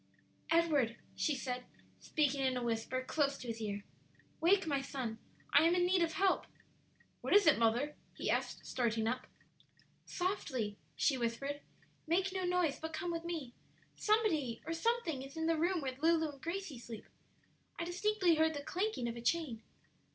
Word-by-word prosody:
"Edward," 295 -9 +3 0.2
she 300 - +1
said, 250 -1 -3 0.4
speaking 285 -3 +1
in 260 -1 +2
a 245 - -2
whisper 235 +2 -1
close 280 +1 +1
to 250 - -8
his 225 -1 -4
ear, 205 -1 -3 0.6
"wake, 380 +4 +4
my 285 -3 +1
son; 255 -5 -4 0.3
I - - +8
am 335 +2 +4
in 355 0 +3
need 365 0 +3
of 330 -1 +1
help." 385 +1 +2 0.7
"What - - +2
is 410 - +7
it, 310 -7 +6
mother?" 235 +6 +2 0.2
he - - -4
asked, - - -1
starting 230 -3 0
up. 250 +3 -2 0.8
"Softly," 265 - -1 0.2
she 270 -4 +2
whispered; 275 +5 -2 0.5
"make 370 +4 +2
no 375 -1 -1
noise, 355 -5 +1
but 320 0 -5
come 355 -2 -2
with 335 0 -3
me. 315 -8 -4 0.4
Somebody 335 - +2
or 325 - -2
something 330 - 0
is 270 +3 -9
in 320 - 0
the 330 0 +3
room 345 +2 +1
where 260 -2 -3
Lulu 320 -1 +3
and 275 -2 -16
Gracie 335 -6 -4
sleep. 230 -2 -8 0.7
I 335 - -2
distinctly 365 0 +2
heard 320 0 +3
the 285 - -4
clanking 365 - -1
of 235 - -3
a 235 - -6
chain." 245 -3 0
305 Hz, 175 wpm, -35 LUFS, 250-345 Hz, 0.8 s, I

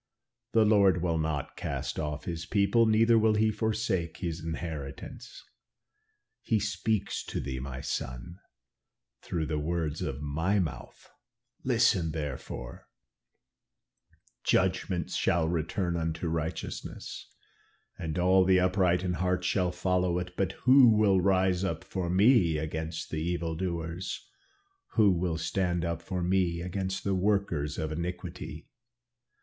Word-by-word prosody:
The 110 -1 +5
Lord 100 -4 +4
will 85 -2 +1
not 80 -3 -2
cast - - -4
off 75 -1 -3
his 85 -1 -4
people, 105 +3 +3
neither 115 +1 +5
will 110 0 +3
he 110 +1 +3
forsake 105 -6 -1
his 85 -3 -4
inheritance.' 80 -4 -6 1.0
He 110 -3 +1
speaks 105 0 -1
to - - -4
thee, 65 0 -4
my 65 0 -6
son, 65 +9 -5 0.8
through 80 -3 -2
the 75 0 -2
words 80 -1 -2
of 70 0 -3
my 80 +7 0
mouth, 90 -6 -4 0.6
listen 115 -10 +2
therefore, 65 -5 -6 1.6
'Judgment 95 -1 +1
shall 85 -2 +1
return 85 +2 -1
unto 80 +1 -2
righteousness, 80 +1 -5 0.6
and 80 +1 -4
all 95 +1 +5
the 95 0 +4
upright 90 -1 +2
in 90 -1 0
heart 90 +1 0
shall 90 -1 +1
follow 90 0 +1
it. 90 0 -4
But 95 -1 0
who 130 -4 +7
will 100 -3 +4
rise 95 -1 +2
up 85 -4 -2
for 90 -3 -3
me 95 - +4
against 80 +1 -4
the 80 - -2
evil 85 -1 -2
doers; 85 0 -4 0.7
who 105 -4 +5
will 85 -2 0
stand 85 0 -1
up 85 0 -2
for 90 0 -3
me 90 -2 +1
against 95 +2 -3
the 100 - 0
workers 95 -7 0
of 80 0 -2
iniquity? 85 0 -5
90 Hz, 130 wpm, -29 LUFS, 80-95 Hz, 1.6 s, who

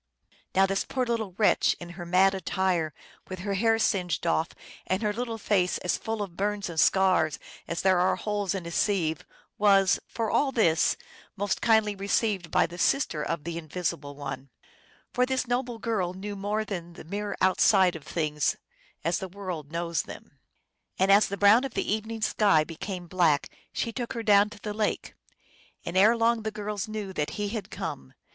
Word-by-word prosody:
Now 195 +1 +6
this 195 0 0
poor 255 -1 -2
small 225 -5 -2
wretch 215 - +3
in 175 - -8
her 175 0 -8
mad 190 +2 +4
attire, 185 -3 0 0.4
with 185 - -5
her 200 +1 -2
hair 225 +3 +3
singed 185 -8 0
off 165 0 +1 0.4
and 190 +4 0
her 210 -1 +1
little 230 0 -3
face 195 -4 +1
as 180 - -1
full 220 -2 -3
of 180 -4 -9
burns 205 0 -2
and 160 - -3
scars 185 -5 +3 0.3
as 170 - -3
there 190 -2 +4
are 180 +1 +3
holes 205 -3 -2
in 185 -3 -4
a 170 - -6
sieve, 170 -5 0 0.4
was, 195 -2 +4
for 225 -2 -2
all 280 -2 +2
this, 175 -10 +3 0.4
most 205 -1 -1
kindly 220 -2 +3
received 200 -2 0
by - - +3
the 175 +1 -9
sister 235 - +1
of 165 0 -3
the 170 +1 -4
Invis 170 +2 -2
ible 145 0 -10
One; 140 -1 -6 0.6
for 250 0 +2
this 260 -1 0
noble 245 -1 -2
girl 200 -6 -2
knew 205 +2 -6
more 205 +2 -2
than 175 -4 -6
the - - -11
mere 205 +5 -4
outside 185 -1 +4
of 160 - -8
things 150 -2 -1 0.5
as 170 +2 0
the 190 - -6
world 180 -6 -6
knows 170 0 -1
them. - - -12 0.6
And 190 +1 +3
as 200 +2 +6
the 200 - -4
brown 205 +5 +6
of 270 -3 -5
the - - 0
evening 220 +1 -4
sky 200 -8 +3
became 175 +3 -6
black, 170 -5 +2 0.2
she 230 - -2
took 240 -1 -4
her 230 - -4
down 205 -1 +5
to 210 -1 -12
the 210 -1 -5
lake. 210 0 -2 0.7
And 170 - -5
erelong 230 +3 +4
the 220 - -2
girls 210 -1 -4
knew 215 -3 -5
that 150 -4 -1
He 205 -1 -1
had 215 -1 -5
come. 65 -1 -6
195 Hz, 190 wpm, -27 LUFS, 175-215 Hz, 0.7 s, Now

